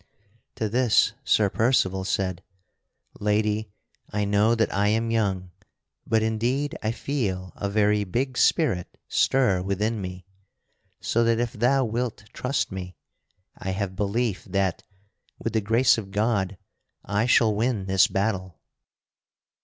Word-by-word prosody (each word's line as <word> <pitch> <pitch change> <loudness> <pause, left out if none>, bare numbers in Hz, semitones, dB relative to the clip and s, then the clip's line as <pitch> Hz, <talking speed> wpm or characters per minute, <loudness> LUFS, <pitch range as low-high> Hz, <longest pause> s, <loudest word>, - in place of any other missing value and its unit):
To 110 - -1
this 120 +1 +3
Sir 105 -3 +3
Percival 95 -6 +2
said: 95 -2 -1 0.8
"Lady, 105 +1 0 0.4
I 105 0 -1
know 105 +3 +3
that 110 -2 0
I 100 +1 +2
am 115 +2 +1
young, 95 -5 -1 0.6
but 110 -1 +2
indeed 120 +6 -1
I 110 - 0
feel 100 - -3
a 100 - -3
very 105 0 +2
big 125 +7 -2
spirit 120 - +1
stir 125 -9 +2
within 105 +3 -1
me, 90 -1 -7 0.8
so 115 - +1
that 115 0 +3
if 120 -1 -1
thou 130 +3 +2
wilt 115 -1 -3
trust 130 -2 -1
me, 90 -1 -6 0.6
I 95 - -6
have 95 -1 -3
belief 105 +1 -1
that, 95 -3 -1 0.6
with 115 - -4
the 110 - +2
grace 115 +3 +3
of 100 -3 -8
God, 100 -2 0 0.5
I 100 +4 0
shall 115 -3 +4
win 110 -2 0
this 95 0 +4
battle." 95 -5 -2
105 Hz, 135 wpm, -25 LUFS, 95-115 Hz, 0.8 s, shall